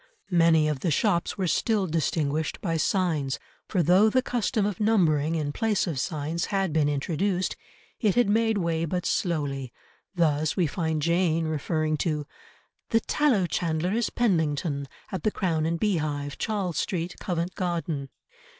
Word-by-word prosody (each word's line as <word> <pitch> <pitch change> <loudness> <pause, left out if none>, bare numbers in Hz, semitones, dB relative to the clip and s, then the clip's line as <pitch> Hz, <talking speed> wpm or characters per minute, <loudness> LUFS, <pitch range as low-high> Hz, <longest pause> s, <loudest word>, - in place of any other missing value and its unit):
Many 165 -3 +4
of 150 -3 -1
the 170 - 0
shops 170 +2 +1
were 190 - 0
still 210 +3 +1
distinguished 155 -2 -1
by 165 -4 -1
signs, 160 -5 0 0.3
for 180 -4 +1
though 185 +7 +5
the 255 +3 +2
custom 235 -3 0
of 205 -3 -2
numbering, 165 -8 +2
in 150 -3 -1
place 215 +5 0
of 160 -8 -3
signs, 155 +4 -2
had 195 -5 -1
been 150 -2 +3
introduced, 175 +6 -1 0.4
it 215 -4 +2
had 245 -2 +4
made 220 +1 +2
way 165 -3 0
but 180 +2 -2
slowly, 140 - -1 0.4
thus 155 -3 +1
we 180 - +3
find 160 -1 -1
Jane 170 -1 +2
referring 155 0 -1
to 150 -2 -1 0.6
"The 225 -1 +3
tallow 260 -11 +2
chandler 170 0 -1
is 230 0 +1
Penlington, 155 -9 0 0.2
at 190 - -3
the 215 - +2
Crown 165 -6 0
and 165 0 -1
Beehive, 150 -8 -1
Charles 195 -7 -1
Street, 175 -1 -2
Covent 175 0 -2
Garden." 165 -6 -2
170 Hz, 155 wpm, -26 LUFS, 155-195 Hz, 0.6 s, though